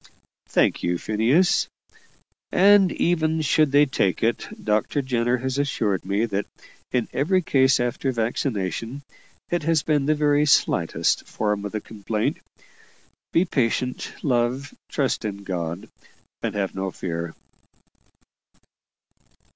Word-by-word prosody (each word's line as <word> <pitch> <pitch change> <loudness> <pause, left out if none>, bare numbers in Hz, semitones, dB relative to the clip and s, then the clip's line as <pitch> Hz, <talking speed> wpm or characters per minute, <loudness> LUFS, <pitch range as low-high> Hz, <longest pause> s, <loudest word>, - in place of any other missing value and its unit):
"Thank - - +2
you, 85 0 0
Phineas; 120 - +2 0.8
and 195 -1 +6
even 160 -2 +1
should 155 0 +3
they 145 +1 +6
take 100 -9 0
it, 115 +1 0 0.2
Dr. 110 +6 +1
Jenner 120 -1 +1
has 130 +2 -2
assured 110 -10 0
me 100 +4 +1
that 100 -2 -2 0.4
in 125 -3 0
every 185 +6 +1
case 130 -4 +3
after 120 +2 -1
vaccination 115 +1 -2 0.5
it 175 -1 +1
has 160 -1 +1
been 145 -3 +1
the 155 - +3
very 150 0 +2
slightest - - +2
form 105 -1 -2
of 100 - -4
the 110 - -3
complaint. 105 0 -3 0.9
Be 170 - +3
patient, 125 -4 -1
love; 125 +1 0 0.2
trust 135 -4 -1
in 100 -2 -5
God, 85 -2 -4 0.5
and - - -3
have 100 -2 -1
no 95 0 -3
fear." 85 -2 -5
125 Hz, 125 wpm, -24 LUFS, 105-145 Hz, 0.9 s, and